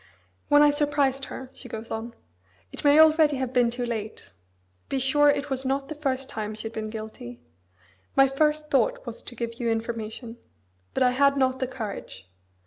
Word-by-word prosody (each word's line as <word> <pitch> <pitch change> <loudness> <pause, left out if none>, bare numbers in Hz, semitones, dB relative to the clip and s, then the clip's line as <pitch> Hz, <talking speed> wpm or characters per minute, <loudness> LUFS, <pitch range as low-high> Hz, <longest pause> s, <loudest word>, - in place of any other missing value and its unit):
"When 290 0 +6
I 295 - +6
surprised 285 -2 +1
her," 260 0 -8
she 250 - -10
goes 225 +1 -7
on: 230 +1 -5 0.6
"It - - -8
may 290 0 +6
already 310 -2 +6
have 260 -1 -3
been 245 -2 +4
too 245 +1 -3
late 220 - -5 0.6
be 275 - -1
sure 290 +3 +4
it 285 0 0
was 265 0 -1
not 270 +1 -1
the - - -3
first 270 -3 -2
time 215 0 -5
she 215 - -8
had 225 0 -6
been 215 -1 -4
guilty 215 - -8 0.8
my 270 0 +6
first 300 +2 0
thought - - +1
was - - -6
to 245 - -8
give 230 0 -5
you 235 -2 0
information. 225 +1 -4 0.6
But - - +3
I 250 - +4
had 280 +2 +3
not 260 -1 +1
the 260 - -1
courage. 220 - -7
260 Hz, 190 wpm, -26 LUFS, 230-285 Hz, 0.8 s, When